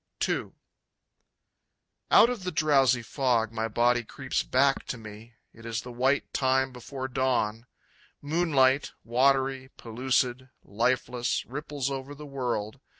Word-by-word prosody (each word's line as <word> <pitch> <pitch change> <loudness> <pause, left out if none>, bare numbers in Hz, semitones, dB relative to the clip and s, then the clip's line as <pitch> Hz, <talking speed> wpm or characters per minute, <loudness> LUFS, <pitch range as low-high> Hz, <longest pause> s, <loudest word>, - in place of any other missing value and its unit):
II. - - -2 1.6
Out 235 - +7
of 230 -6 -5
the 180 - -2
drowsy 135 -6 +3
fog 120 -3 0
my 110 0 -2
body 120 +2 +2
creeps 130 +3 -3
back 135 +1 +2
to 125 - -4
me. 110 +1 -12 0.2
It 115 - -15
is 115 0 -4
the 125 - -8
white 130 +4 0
time 130 -1 +1
before 130 +2 -6
dawn. 120 -3 -1 0.5
Moonlight, 145 -3 +2
watery, 130 +2 +1
pellucid, 125 +2 -1
lifeless, 120 +3 -1
ripples 140 0 -4
over 135 +1 -5
the 150 +1 -10
world. 125 -4 -3
130 Hz, 125 wpm, -27 LUFS, 120-135 Hz, 1.6 s, Out